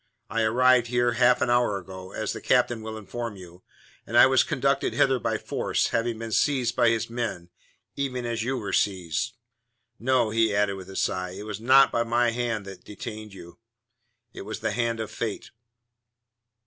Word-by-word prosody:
I 115 - 0
arrived 125 +2 +4
here 120 0 +1
half 120 +1 +3
an 125 - +1
hour 120 -4 +2
ago, 95 0 -9
as - - -3
the - - -7
captain 120 -2 +2
will 110 0 -6
inform 115 +1 -6
you, 90 -1 -13 0.5
and - - 0
I - - +9
was - - +4
conducted - - 0
hither - - +3
by - - -1
force, - - -1
having 115 0 -1
been 115 0 -6
seized 125 -1 +1
by 120 -2 +4
his 115 0 0
men, 115 -7 -4 0.5
even 130 -3 -3
as 115 -1 -2
you 130 +3 -1
were 105 -4 -5
seized. 95 +4 0 0.6
No," 125 -2 +2
he 110 -2 +2
added, 100 -1 +2
with 95 -1 -9
a 95 - -9
sigh, 90 -1 -2
"it - - -7
was 105 -1 -5
not 135 +3 +6
my 120 0 +2
hand 115 -3 -2
that 95 -2 -10
detained 105 0 -8
you; 85 0 -13 0.7
it - - -8
was 110 +2 -6
the 110 - -1
hand 115 +1 -1
of 110 - -4
Fate." 110 -3 -5
115 Hz, 185 wpm, -26 LUFS, 100-120 Hz, 0.7 s, I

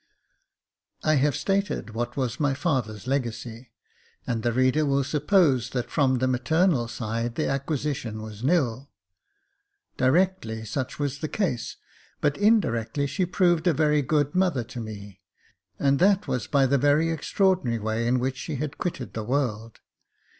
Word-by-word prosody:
I 155 -1 +3
have 140 0 +2
stated 195 - -1
what 120 +3 -4
was 130 -4 -2
my 145 -3 +1
father's 130 - -2
legacy, 120 -2 -3 0.6
and 115 -2 -2
the 120 - +1
reader 130 +5 +2
will 140 -1 +1
suppose 145 - +2
that 125 -2 -4
from 130 -4 +2
the 130 +1 +1
maternal 130 +2 +2
side 115 0 -3
the - - 0
acquisition 135 -5 -2
was 110 0 -8
nil. 135 -4 +1 1.1
Directly 130 -5 +1
such 130 +4 -4
was 145 -1 -2
the 155 - -3
case, 165 - -2 0.4
but 145 -1 +1
in 215 +2 +5
directly 120 - -2
she 145 +6 -1
proved 175 -2 +2
a 175 - +4
very 150 0 +2
good 145 +1 0
mother 180 -9 +1
to 125 +2 -9
me, 100 -3 -8 0.6
and 140 0 +2
that 195 +2 +3
was 125 - -2
by 140 -2 +3
the 140 +1 +2
very 145 +4 +3
extraordinary 165 - +1
way 110 +2 -2
in 125 +1 +2
which 130 +1 -2
she 150 - -5
had 150 +3 -4
quitted 135 - -4
the 110 - -4
world. 115 -3 -2
135 Hz, 155 wpm, -25 LUFS, 120-155 Hz, 1.1 s, in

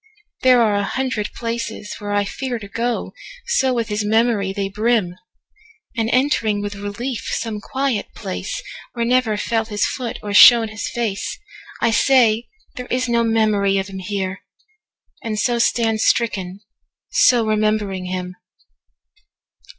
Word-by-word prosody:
There 250 -2 +5
are 215 -2 +2
a 205 0 +1
hundred 255 -2 -2
places 230 -2 -5
where 205 0 -5
I 205 0 +2
fearTo 230 -2 -5
go,—so 265 - -2
with 235 -3 -1
his 210 0 -1
memory 215 -2 +2
they 195 0 -2
brim! 210 -3 0 0.8
And 225 -1 0
entering 250 -6 +2
with 205 0 -4
relief 205 +5 -5
some 220 -2 -3
quiet 265 -3 -2
placeWhere 235 -1 -5
never 245 -3 +2
fell 225 +1 -1
his 210 -2 -1
foot 245 -3 -4
or 205 -1 -4
shone 230 +1 +8
his 215 -1 -5
faceI 235 - -3
say, 235 -2 +3 0.3
"There 250 0 -6
is 255 0 -1
no 235 -1 +2
memory 215 -3 +2
of 195 0 -2
him 190 -1 -7
here!"And 205 - -7
so 240 +2 +1
stand 225 -1 +1
stricken, 200 -6 0 0.5
so 240 -3 +4
remembering 215 -3 0
him! 180 0 -5
220 Hz, 130 wpm, -20 LUFS, 205-240 Hz, 0.8 s, shone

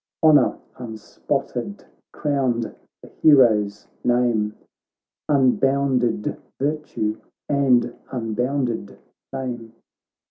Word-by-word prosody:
Honour 155 -2 +5 0.2
unspotted 120 - -4 0.3
crowned 130 -6 -1 0.3
the - - -11
hero's 110 -9 +4 0.2
name. 120 -4 +1 0.7
Unbounded 135 -4 +2 0.2
virtue 140 -7 -2 0.3
and 130 -4 +2 0.2
unbounded 120 -3 -2 0.3
fame. 120 -4 -5
125 Hz, 65 wpm, -22 LUFS, 115-140 Hz, 0.7 s, Honour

